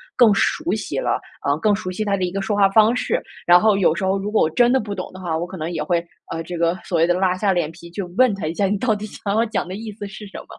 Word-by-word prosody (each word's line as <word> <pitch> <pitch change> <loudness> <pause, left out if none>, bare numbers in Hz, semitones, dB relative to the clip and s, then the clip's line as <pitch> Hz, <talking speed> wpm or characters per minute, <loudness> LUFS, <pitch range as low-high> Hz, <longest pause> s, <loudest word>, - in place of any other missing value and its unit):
更 235 -5 +6
熟 320 - 0
悉 - - -3
了， - - 0 0.3
呃， 140 +1 +2
更 205 +4 +3
熟 195 -3 -5
悉 215 +4 -3
他 200 -1 +1
的 185 - -2
一 180 - -4
个 195 +2 -3
说 205 +2 -1
话 200 -1 +4
方 220 +4 +4
式。 - - 0 0.3
然 175 +1 +7
后 215 -2 +4
有 180 -5 +3
时 190 +2 -2
候 190 +1 +1
如 205 +2 -4
果 215 - +3
我 155 - +2
真 240 +8 +4
的 265 - +3
不 210 -3 -5
懂 185 - -6
的 185 - -10
话， 175 -3 -2
我 175 - -3
可 185 +1 -8
能 160 0 -3
也 160 -3 -2
会， 170 +2 0 0.3
呃， 165 - -3
这 175 +1 -6
个 170 +1 +1
所 170 -3 0
谓 165 - +4
的 175 - +3
拉 185 0 +1
下 200 0 +1
脸 170 -3 -1
皮 170 +1 -13
就 190 +2 -5
问 255 -3 +5
他 190 -5 -4
一 160 - -2
下， 200 +3 0
你 205 +2 0
到 220 +1 +1
底 210 +1 -6
想 200 -1 -4
要 225 +1 +3
讲 215 -5 -2
的 185 - -5
意 220 +1 -6
思 205 0 -7
是 210 +1 -10
什 195 - -10
么？ - - -17
195 Hz, 350 characters per minute, -21 LUFS, 175-215 Hz, 0.3 s, 然